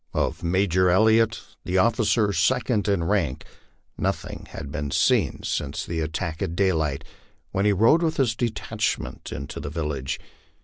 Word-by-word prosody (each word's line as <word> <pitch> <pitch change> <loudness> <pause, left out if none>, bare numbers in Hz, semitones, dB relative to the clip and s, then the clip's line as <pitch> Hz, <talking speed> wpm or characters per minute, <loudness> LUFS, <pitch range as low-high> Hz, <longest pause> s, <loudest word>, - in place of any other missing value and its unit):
Of - - 0
Major 90 +1 +2
Elliot, 110 +4 +4 0.2
the 90 - -1
officer 110 0 +3
second 110 +5 +1
in 100 -4 +1
rank, 85 -8 0 0.5
nothing - - -3
had 70 - -7
been 70 0 -3
seen - - +2
since 75 +3 -2
the 85 -1 -3
at 80 0 -2
tack 80 -1 -3
at 90 -4 -2
daylight, 80 -7 +1 0.5
when 95 +2 0
he 105 - +5
rode 115 - +4
with 160 -2 0
his 120 -5 +2
detachment 110 - -2
into 70 - -6
the - - -5
village. 75 -4 -3
95 Hz, 150 wpm, -25 LUFS, 80-110 Hz, 0.5 s, he